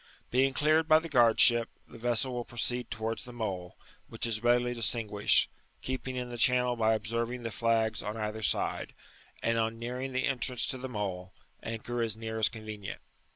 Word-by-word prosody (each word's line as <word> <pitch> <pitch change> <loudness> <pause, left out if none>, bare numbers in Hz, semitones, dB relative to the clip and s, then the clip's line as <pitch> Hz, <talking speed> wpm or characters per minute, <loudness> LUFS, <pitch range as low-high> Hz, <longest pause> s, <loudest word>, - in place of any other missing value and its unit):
''*' - - -37
Being 135 +2 +3
cleared 155 +2 +3
by 155 -1 +7
the 160 +1 -3
g^ard 120 -5 +4
ship, 120 -1 +7 0.2
the - - -13
vessel 120 +2 0
will 120 -1 -3
proceed 120 0 -2
towards 110 0 -3
the 125 - -10
Mole, 95 -7 -5 0.3
which - - -2
is 110 -2 -1
readily 120 0 +2
distinguished, 110 -3 +2 0.4
keeping 130 0 -4
in 125 -1 -4
the 120 - -6
channel 125 0 +3
by 110 -1 +2
observing 115 +3 -3
the 115 - -4
flags 115 -1 +1
on 105 +1 -5
either 110 0 -4
side; - - -1 0.5
and 115 0 +1
on 115 0 -1
nearing 125 +3 -5
tl^ 130 0 0
entrance 130 -2 0
to 130 - -2
the 130 +1 -6
Mole, 95 -5 -4 0.3
anchor 115 +1 -4
as 110 -2 -1
near 110 0 -5
as 105 -2 +5
convenient. 110 -2 -7
115 Hz, 190 wpm, -30 LUFS, 110-125 Hz, 0.5 s, by